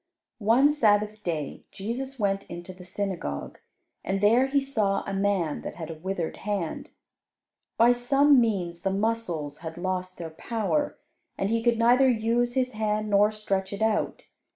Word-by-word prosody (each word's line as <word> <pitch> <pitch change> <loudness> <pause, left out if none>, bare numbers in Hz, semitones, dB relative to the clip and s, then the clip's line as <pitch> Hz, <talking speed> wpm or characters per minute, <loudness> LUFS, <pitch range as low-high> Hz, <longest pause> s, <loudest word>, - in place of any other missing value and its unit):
One 240 +7 +4
Sabbath 210 -6 +2
day 155 -7 -4
Jesus 255 +7 -5
went 195 -1 0
into 175 +2 -8
the 180 0 -13
synagogue, 180 - -4 0.4
and 195 +1 -1
there 230 +6 +4
He 280 +1 +2
saw 220 -8 0
a 195 - -4
man 195 -6 0
that - - -6
had 165 -2 -6
a - - -4
withered 170 +1 -4
hand. 200 -6 -3 0.9
By 235 +2 +6
some 275 +3 +4
means 180 -7 -1
the 195 - 0
muscles 190 -8 -2
had 160 0 -7
lost 185 0 -3
their 165 -2 -6
power, 230 - -1 0.4
and 195 +2 -1
he 230 0 +1
could 235 0 +2
neither 245 +3 +5
use 240 +1 +1
his 255 -1 +1
hand 215 -1 -1
nor 205 +1 +5
stretch 195 -3 -2
it 200 +2 -2
out. 220 -1 0
205 Hz, 160 wpm, -27 LUFS, 185-235 Hz, 0.9 s, By